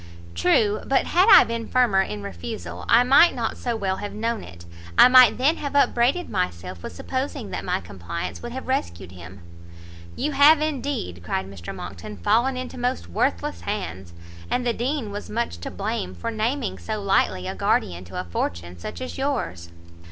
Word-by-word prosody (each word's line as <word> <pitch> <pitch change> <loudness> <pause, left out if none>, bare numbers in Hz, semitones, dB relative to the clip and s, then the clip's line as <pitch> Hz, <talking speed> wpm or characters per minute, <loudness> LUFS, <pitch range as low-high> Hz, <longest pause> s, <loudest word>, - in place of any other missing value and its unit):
"True; 205 - +2
but 270 - +2
had 370 +5 +3
I - - +10
been 230 0 -4
firmer 240 -7 +3
in 105 - -4
refusal, 85 -2 -7
I 235 +2 +6
might 275 +7 +6
not 235 -3 -2
so 240 -2 -3
well 190 -3 -1
have 205 - -6
known 225 0 -2
it; 85 0 -12 0.3
I - - +10
might 255 -3 +7
then 285 +6 +2
have 285 -1 -5
upbraided 280 +4 +2
myself 90 0 -3
with 85 - -8
supposing 260 - -4
that - - -4
my - - -1
compliance 85 -1 -6
would - - -6
have - - -7
rescued 85 +1 -2
him." 90 +1 -12 0.7
"You 300 - -1
have 290 +2 +6
indeed," 275 - -3
cried 95 +2 -2
Mr 95 -3 -8
Monckton, 100 +4 -8
"fallen 240 - +2
into 255 0 -6
most 245 - -2
worthless 85 0 -1
hands, 85 +1 -5 0.4
and 250 - 0
the 240 - +1
Dean 245 -1 -2
was 205 +1 -6
much 220 - -2
to - - -6
blame 90 0 -4
for 85 - -4
naming 230 +3 -2
so 215 -1 -4
lightly 195 - +1
a - - -3
guardian 90 0 0
to 90 +1 -6
a - - -2
fortune 85 0 -4
such 85 - -7
as 255 - -6
yours." 245 - -2
200 Hz, 180 wpm, -24 LUFS, -, 0.7 s, I